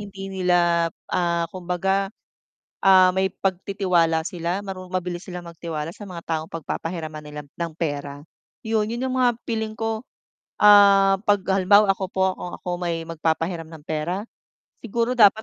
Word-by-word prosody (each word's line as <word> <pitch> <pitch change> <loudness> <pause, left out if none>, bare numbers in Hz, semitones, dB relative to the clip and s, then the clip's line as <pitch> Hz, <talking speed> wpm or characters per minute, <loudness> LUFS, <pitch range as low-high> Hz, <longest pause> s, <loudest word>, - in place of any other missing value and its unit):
hindi 195 -1 -8
nila, 175 -2 +2 0.2
ah, 170 -1 +1
kumbaga, 190 +2 -1 0.7
ah, 185 -1 +6
may 190 +1 +1
pagtitiwala 185 -4 0
sila 180 +1 -3
maru 185 -2 -7
mabilis 180 -1 -3
silang 180 -1 -7
magtiwala 165 -1 -5
sa 205 0 -10
mga 170 -2 -7
taong 160 -1 -3
pagpapahiraman 160 0 -5
nila 150 0 -7
ng 165 +3 -6
pera 145 -3 -3 0.4
'yon. 220 -1 +1
'Yon 235 +2 -3
'yung 260 - -2
mga 245 -2 +3
feeling 220 -2 -3
ko, 225 -1 -2 0.6
ah, 200 -1 +7
'pag 205 -2 +3 0.2
halimbawa 200 +2 +5
ako 195 0 0
po, 190 0 0
kung 180 - -6
ako - - -9
may 170 -2 -2
magpapahiram 165 +1 -2
ng 160 -1 -12
pera, 160 +5 -2 0.6
siguro 235 +2 -1
dapat 215 0 +6
180 Hz, 150 wpm, -23 LUFS, 165-195 Hz, 0.7 s, ah